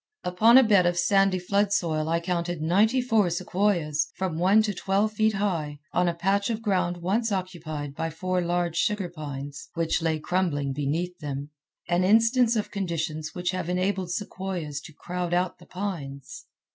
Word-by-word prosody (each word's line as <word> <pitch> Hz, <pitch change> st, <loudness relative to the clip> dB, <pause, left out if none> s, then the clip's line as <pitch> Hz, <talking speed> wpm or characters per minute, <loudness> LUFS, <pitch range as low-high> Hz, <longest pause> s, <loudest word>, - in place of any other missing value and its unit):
Upon 220 Hz, +7 st, +5 dB
a 265 Hz, -, +8 dB
bed 200 Hz, -6 st, +4 dB
of 175 Hz, 0 st, 0 dB
sandy 195 Hz, +1 st, +3 dB
floodsoil 180 Hz, -5 st, 0 dB
I 165 Hz, +1 st, +2 dB
counted 175 Hz, -1 st, -2 dB
ninety 205 Hz, +11 st, +3 dB
four 225 Hz, -7 st, +2 dB
sequoias, 170 Hz, -4 st, 0 dB
from 180 Hz, -4 st, -2 dB
one 195 Hz, +5 st, +5 dB
to 210 Hz, -1 st, -1 dB
twelve 195 Hz, +3 st, 0 dB
feet 215 Hz, +1 st, +2 dB
high, 165 Hz, -7 st, -1 dB, 0.2 s
on 180 Hz, 0 st, +2 dB
a 170 Hz, -, 0 dB
patch 195 Hz, +4 st, +1 dB
of 225 Hz, -1 st, -3 dB
ground 180 Hz, -4 st, 0 dB
once 220 Hz, +5 st, 0 dB
occupied 165 Hz, -7 st, -4 dB
by 165 Hz, +3 st, -3 dB
four 180 Hz, +3 st, -1 dB
large 175 Hz, -1 st, -1 dB
sugar 200 Hz, -1 st, 0 dB
pines 145 Hz, -3 st, -7 dB
which 165 Hz, 0 st, 0 dB
lay 160 Hz, -1 st, +1 dB
crumbling 150 Hz, -5 st, -1 dB
beneath 160 Hz, +6 st, -2 dB
them—an 150 Hz, +4 st, -4 dB
instance 230 Hz, +4 st, +4 dB
of 215 Hz, -, -2 dB
conditions 160 Hz, -5 st, -3 dB
which 180 Hz, 0 st, -1 dB
have 185 Hz, -2 st, -3 dB
enabled 185 Hz, 0 st, 0 dB
sequoias 180 Hz, -6 st, -4 dB
to 160 Hz, -, -11 dB
crowd 175 Hz, +3 st, -3 dB
out 180 Hz, 0 st, -1 dB
the -, -, -16 dB
pines. 185 Hz, -, -6 dB
180 Hz, 165 wpm, -26 LUFS, 160-200 Hz, 0.2 s, a